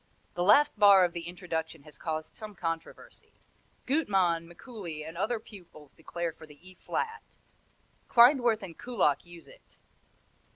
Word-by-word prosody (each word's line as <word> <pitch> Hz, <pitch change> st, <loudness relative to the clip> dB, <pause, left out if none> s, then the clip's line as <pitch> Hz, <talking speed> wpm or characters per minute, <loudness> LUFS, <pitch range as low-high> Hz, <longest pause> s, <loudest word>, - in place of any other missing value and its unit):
The 175 Hz, -, -4 dB
last 210 Hz, +5 st, +4 dB
bar 200 Hz, -3 st, +7 dB
of 175 Hz, -, -4 dB
the 170 Hz, -1 st, -6 dB
introduction 165 Hz, -4 st, -5 dB
has 150 Hz, 0 st, -13 dB
caused 155 Hz, -1 st, -4 dB
some 215 Hz, -2 st, -9 dB
controversy. 165 Hz, -2 st, -7 dB, 0.5 s
Gutmann, 190 Hz, -, +1 dB
Mikuli 175 Hz, -, -8 dB
and 160 Hz, -, -9 dB
other 220 Hz, +6 st, -1 dB
pupils 175 Hz, -9 st, -15 dB
declare 170 Hz, +1 st, -5 dB
for 160 Hz, -, -14 dB
the 150 Hz, -1 st, -16 dB
E 185 Hz, -, -12 dB
flat; 450 Hz, -, -5 dB, 0.7 s
Klindworth 240 Hz, -3 st, +5 dB
and 175 Hz, -4 st, -9 dB
Kullak 230 Hz, -, 0 dB
use 175 Hz, -1 st, -14 dB
it. -, -, -20 dB
175 Hz, 140 wpm, -29 LUFS, 165-215 Hz, 0.7 s, bar